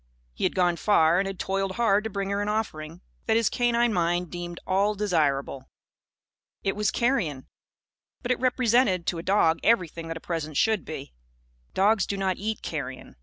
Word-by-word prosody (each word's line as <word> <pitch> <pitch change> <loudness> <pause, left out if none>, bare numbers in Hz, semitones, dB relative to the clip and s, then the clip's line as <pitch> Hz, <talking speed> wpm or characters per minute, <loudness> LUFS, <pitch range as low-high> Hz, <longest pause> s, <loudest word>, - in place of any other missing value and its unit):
He - - -2
had - - 0
gone 175 -2 +2
far 170 -4 +4
and 195 - 0
had 195 -1 -5
toiled 195 +1 -2
hard 210 -2 +2
to - - -2
bring 195 -1 -3
her 200 0 0
an 205 - -2
offering 170 -6 -3 0.3
that 225 0 +3
his 230 - +2
canine 240 -1 +2
mind 175 -1 0
deemed 175 -1 -6
all 200 +3 +1
desirable. 145 -9 0 0.9
It 195 - 0
was 210 -1 +1
carrion; 195 - 0 0.8
but 245 - -1
it 250 - +1
represented, 240 -7 +2
to 170 - -1
a - - -4
dog, 175 -3 +2
everything 170 -7 +1
that 165 0 -4
a - - -8
present 160 -4 -4
should 220 -6 +2
be. 60 - -7 0.6
Dogs 200 +1 +3
do 200 - -2
not 190 -1 0
eat 220 +2 -4
carrion. 130 -5 -6
195 Hz, 180 wpm, -26 LUFS, 165-215 Hz, 0.9 s, far